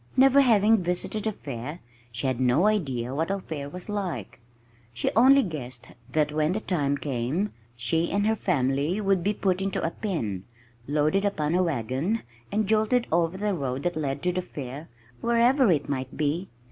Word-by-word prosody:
Never 270 +1 +7
having 220 -4 +4
visited 180 +5 -2
a - - +1
fair, 145 - -7 0.3
she 115 +4 -5
had 130 -2 0
no 130 +8 +3
idea 135 - 0
what 160 +5 -1
a 195 0 0
fair 145 -6 -6
was 180 +4 -8
like. 185 - -4 0.6
She 120 - 0
only 265 +4 +7
guessed 130 - -6 0.2
that 150 -1 +2
when 155 +2 +1
the 215 - -1
time 145 -9 0
came, 140 - -2 0.2
she 120 +8 0
and 205 +1 +1
her 220 +1 +3
family 145 0 0
would 195 -4 +1
be 205 +1 +1
put 190 -1 0
into 195 0 -1
a 165 - 0
pen, 115 - -3 0.4
loaded 155 +6 +2
upon 155 -7 0
a 180 - +3
wagon, 155 - -1 0.3
and 210 +1 +1
jolted 220 +4 +2
over 170 +2 +1
the 205 +1 0
road 135 -5 -3
that 175 0 -1
led 140 -2 -2
to 180 - +2
the 185 - -1
fair, 145 -3 -8 0.3
wherever 235 +2 +4
it 150 -5 +2
might 130 -2 -4
be. 155 +5 -1
170 Hz, 180 wpm, -26 LUFS, 140-205 Hz, 0.6 s, Never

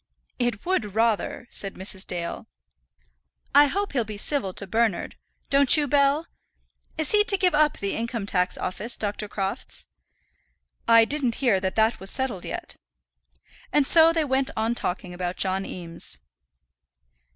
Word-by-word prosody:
"It 240 -4 -1
would 225 - -1
rather," 225 +1 0
said 195 -1 -4
Mrs. 190 0 -3
Dale. 175 +4 -5 1.1
"I 290 +1 +7
hope 400 +6 -2
he'll 250 -4 +1
be 210 -1 -8
civil 215 -3 +1
to 200 - -6
Bernard. 220 0 -1 0.4
Don't 280 +2 +6
you, 295 -1 +1
Bell? 285 +3 +2 0.7
Is 315 -2 +1
he 420 0 +5
to 400 -3 +5
give 365 -1 +2
up 300 0 +3
the 200 0 -2
Income 230 -2 -3
tax 180 -2 0
Office, 215 +6 -3
Dr. 210 0 -3
Crofts?" 200 +3 -3 1.0
"I 230 -1 +7
didn't 260 -4 0
hear 235 -8 +2
that 185 0 -3
that 220 +1 +2
was 190 - +1
settled 255 -8 +1
yet." - - -6 0.9
And 295 -2 +3
so 325 +3 +6
they 325 -2 0
went 265 -1 +1
on 225 +2 0
talking 180 -4 -3
about 175 0 -4
John 190 0 -1
Eames. 165 - -6
230 Hz, 150 wpm, -25 LUFS, 195-280 Hz, 1.1 s, I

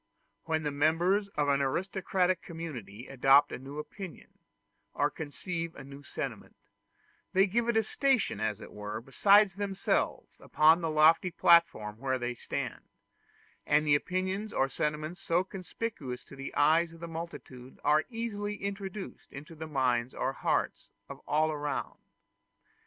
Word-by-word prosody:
When 160 -1 0
the 145 - -1
members 170 +8 +2
of 145 -1 +1
an 140 0 +3
aristocratic 185 +4 0
community 130 - -7
adopt 135 +2 +4
a - - -5
new 135 +3 -9
opinion, 180 +4 -9 0.6
or 145 +1 +1
conceive 165 +2 -5
a - - -9
new 140 +1 -11
sentiment, 140 - -6 0.8
they 190 +1 +5
give 230 +4 0
it 235 - +2
a 225 - +4
station, 255 - +1
as 110 -1 -1
it - - -11
were, 105 +1 -5
beside 200 - +5
themselves, 195 0 -1
upon 160 +3 +4
the 165 - -1
lofty 155 +3 +5
platform 165 -12 +3
where 130 0 0
they 120 0 -3
stand; 120 - -5 0.8
and 150 0 +3
opinions 185 +7 -1
or 135 - +1
sentiments 150 +5 -3
so 170 +2 +1
conspicuous 185 - -6
to - - -13
the 135 0 -6
eyes 160 +3 +3
of 165 - -13
the 170 - -6
multitude 160 -6 -8
are 150 +2 +3
easily 210 -3 -3
introduced 200 0 -6
into 150 +5 -10
the 160 0 -7
minds 130 -4 0
or 135 - -1
hearts - - -1 0.2
of - - -8
all 155 +1 +2
around. 145 -1 -3
160 Hz, 145 wpm, -30 LUFS, 140-185 Hz, 0.8 s, they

